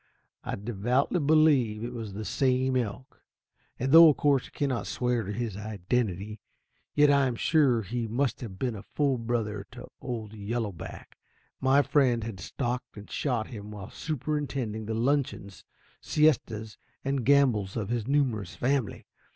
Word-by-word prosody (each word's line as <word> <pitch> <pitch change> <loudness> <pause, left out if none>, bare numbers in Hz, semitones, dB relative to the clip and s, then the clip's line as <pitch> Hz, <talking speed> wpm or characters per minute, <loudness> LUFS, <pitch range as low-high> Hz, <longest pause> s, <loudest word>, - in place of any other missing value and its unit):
I - - -3
devoutly 120 - 0
believe 140 -8 +3
it 120 +1 -4
was 110 -4 -6
the 105 +2 -5
same 130 0 +1
elk, 125 +1 -3 0.6
and 130 +2 -1
though 165 +1 +10
of 145 - +2
course 140 -3 +2
I - - -17
cannot 135 -4 -1
swear 125 -1 0
to 100 -1 -5
his 115 -2 -3
identity, 105 0 -2 0.6
yet 145 0 +6
I 140 -1 +4
am 125 - -2
sure 130 -4 +3
he 115 +4 -3
must 120 +2 -1
have 105 -6 -7
been 125 +1 -2
a 100 - -7
full 140 +1 0
brother 110 -3 -2
to 125 0 -10
old 115 -4 -5
Yellow 110 +1 -3
Back. 85 - -10 0.4
My 135 +2 +4
friend 125 -7 +2
had 110 -4 -6
stalked 125 +5 -4
and 105 - -11
shot 120 -6 -1
him 105 -4 -8
while 105 -2 -8
superintending 140 -7 -3
the 110 - -2
luncheons, 120 -6 -1 0.4
siestas 115 -8 +1 0.3
and 135 -2 0
gambols 125 -8 +3
of 105 -3 -3
his 120 -2 -2
numerous 125 -10 0
family. 130 -3 -1
120 Hz, 160 wpm, -28 LUFS, 105-135 Hz, 0.6 s, though